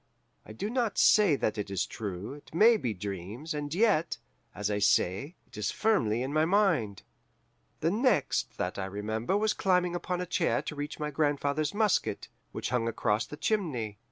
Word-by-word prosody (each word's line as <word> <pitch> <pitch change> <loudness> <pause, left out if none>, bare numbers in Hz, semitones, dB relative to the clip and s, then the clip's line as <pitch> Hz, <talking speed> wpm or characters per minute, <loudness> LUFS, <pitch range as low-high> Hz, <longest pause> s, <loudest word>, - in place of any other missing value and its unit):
I - - -9
do 110 - -4
not 235 -5 0
say 205 -8 +5
that 110 -5 -1
it 100 - -3
is 95 -2 -1
true 100 +2 -6
it 145 +2 -13
may 225 +6 +7
be 130 - -2
dreams; 105 - -5
and 145 -1 -4
yet, 175 -3 +2 0.4
as 105 0 -2
I 105 - 0
say, 100 - +1
it - - -17
is 105 - 0
firmly 125 - +1
in 135 +2 -4
my 155 0 +3
mind. 165 - +1 0.8
"The 165 - +2
next 205 - +1
that 90 +2 -3
I 95 - -2
remember 110 - -2
was 215 0 +1
climbing 180 -2 +1
upon 175 +1 -2
a 180 - -2
chair 175 -1 0
to 150 - -5
reach 145 0 -4
for 155 - -6
my 150 - -2
grandfather's 145 +2 0
musket, 210 -2 +1 0.2
which - - -4
hung 120 -2 +1
across 110 -1 0
the 150 - -8
chimney. 130 - -1
145 Hz, 185 wpm, -29 LUFS, -, 0.8 s, may